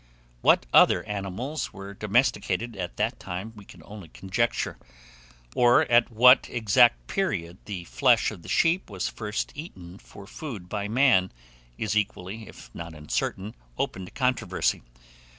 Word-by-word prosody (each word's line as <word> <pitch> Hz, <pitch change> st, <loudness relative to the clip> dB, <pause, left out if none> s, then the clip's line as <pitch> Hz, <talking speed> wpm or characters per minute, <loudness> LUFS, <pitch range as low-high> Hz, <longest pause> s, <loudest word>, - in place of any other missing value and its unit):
What -, -, +4 dB
other -, -, +6 dB
animals 105 Hz, +8 st, -4 dB
were 100 Hz, +1 st, -9 dB
domesticated 110 Hz, 0 st, 0 dB
at 90 Hz, -2 st, -6 dB
that 110 Hz, +4 st, -1 dB
time 95 Hz, +5 st, -6 dB
we 105 Hz, -2 st, -13 dB
can 90 Hz, -4 st, -15 dB
only 100 Hz, -4 st, -10 dB
conjecture, 105 Hz, +8 st, -2 dB, 0.7 s
or 120 Hz, 0 st, +5 dB
at 120 Hz, 0 st, +5 dB
what 125 Hz, +3 st, +6 dB
exact 120 Hz, +1 st, +3 dB
period 95 Hz, -, -2 dB
the 95 Hz, -4 st, -6 dB
flesh 125 Hz, +5 st, +2 dB
of 100 Hz, -5 st, -10 dB
the -, -, -12 dB
sheep 170 Hz, 0 st, +2 dB
was 95 Hz, -3 st, -3 dB
first 105 Hz, -1 st, -4 dB
eaten 95 Hz, -, -10 dB
for 100 Hz, -, -13 dB
food 115 Hz, -, -8 dB
by 105 Hz, +2 st, -3 dB
man, 115 Hz, -5 st, +3 dB, 0.5 s
is 110 Hz, -1 st, -2 dB
equally, 105 Hz, 0 st, -3 dB
if -, -, -14 dB
not 85 Hz, -1 st, -8 dB
uncertain, 95 Hz, +7 st, -3 dB, 0.2 s
open 95 Hz, 0 st, -3 dB
to -, -, -13 dB
controversy. 115 Hz, -, 0 dB
105 Hz, 145 wpm, -26 LUFS, 95-120 Hz, 0.7 s, other